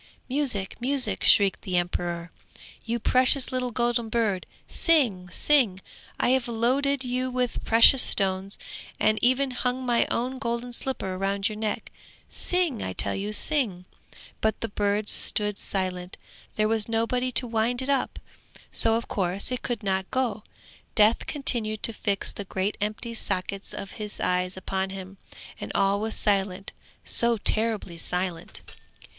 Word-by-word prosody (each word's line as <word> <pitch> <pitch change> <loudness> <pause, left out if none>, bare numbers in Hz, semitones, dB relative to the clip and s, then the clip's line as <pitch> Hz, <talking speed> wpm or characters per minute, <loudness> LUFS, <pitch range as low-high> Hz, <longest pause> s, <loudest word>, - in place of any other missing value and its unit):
'Music, 250 -9 0
music!' 265 +1 0
shrieked 200 -2 +4
the 185 -2 -1
emperor. 175 -1 -2 0.5
'You 235 0 -2
precious 255 +3 +4
little 255 -1 -1
golden 240 -1 0
bird, 215 -5 0 0.2
sing, 235 - +1
sing! 230 -2 +2 0.4
I - - +2
have 260 -1 +2
loaded 260 +4 +1
you 255 +1 -1
with 250 -1 -2
precious 230 +3 +7
stones, 195 0 +2 0.4
and 215 0 +2
even 260 +2 +3
hung 250 +1 -1
my 240 -1 +2
own 255 +2 -2
golden 235 0 -3
slipper 195 -8 -2
round 195 +1 0
your 215 - -6
neck; 215 0 -3 0.4
sing, 355 -10 +1
I 95 - -3
tell 100 - -1
you, 205 +2 -3
sing!' 215 -6 0 0.6
But 220 0 0
the 230 - -2
bird 205 +1 -1
stood 210 -1 +1
silent; 185 -2 -3 0.4
there 215 0 +2
was 220 0 0
nobody 245 +3 0
to 245 - +5
wind 235 +2 0
it - - -4
up, 275 -2 0 0.5
so 225 -1 +2
of 230 - -3
course 190 +3 -1
it 250 - -2
could 240 -4 -3
not 190 -1 -1
go. 245 -5 -1 0.5
Death 215 +1 +4
continued 230 -7 -2
to 230 - 0
fix 200 -2 -2
the 205 - -6
great 190 +2 -2
empty 215 +3 -3
sockets 195 -2 -3
of 195 - -7
his 210 -1 -3
eyes 180 0 0
upon 190 0 -2
him, 190 0 -8 0.4
and - - -6
all 195 +1 +2
was 220 +1 -3
silent, 195 -1 0 0.3
so 235 -1 +4
terribly 215 -5 +1
silent. 180 -1 -3
220 Hz, 150 wpm, -26 LUFS, 195-245 Hz, 0.6 s, precious